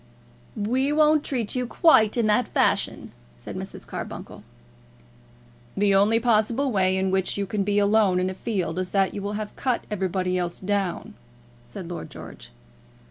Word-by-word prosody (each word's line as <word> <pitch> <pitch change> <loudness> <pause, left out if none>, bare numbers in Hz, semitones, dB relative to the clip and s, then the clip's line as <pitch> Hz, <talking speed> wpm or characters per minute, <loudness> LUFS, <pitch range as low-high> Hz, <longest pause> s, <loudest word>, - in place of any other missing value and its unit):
"We 250 +7 0
won't 305 0 +4
treat 240 -6 -2
you 250 -1 -1
quite 225 -7 +4
in 235 - +2
that 215 +4 +2
fashion," - - 0 0.3
said - - -8
Mrs. - - -7
Carbuncle. - - -7 1.4
"The 200 0 +3
only 205 +4 +4
possible 235 +3 +1
way 190 -3 +2
in 190 0 0
which 190 0 0
you 200 - -1
can 200 +1 -1
be 205 +1 0
alone 205 -2 +3
in 185 - 0
a 185 - -3
field 185 -5 -3
is 185 0 -2
that 195 -1 +1
you 200 - -5
will 200 +1 -3
have 210 0 -5
cut 255 -3 -1
everybody 185 -2 -1
else 175 -1 -3
down," 200 +1 -2 0.5
said 175 +8 -8
Lord 175 - -6
George. - - -11
205 Hz, 165 wpm, -24 LUFS, 190-230 Hz, 1.4 s, won't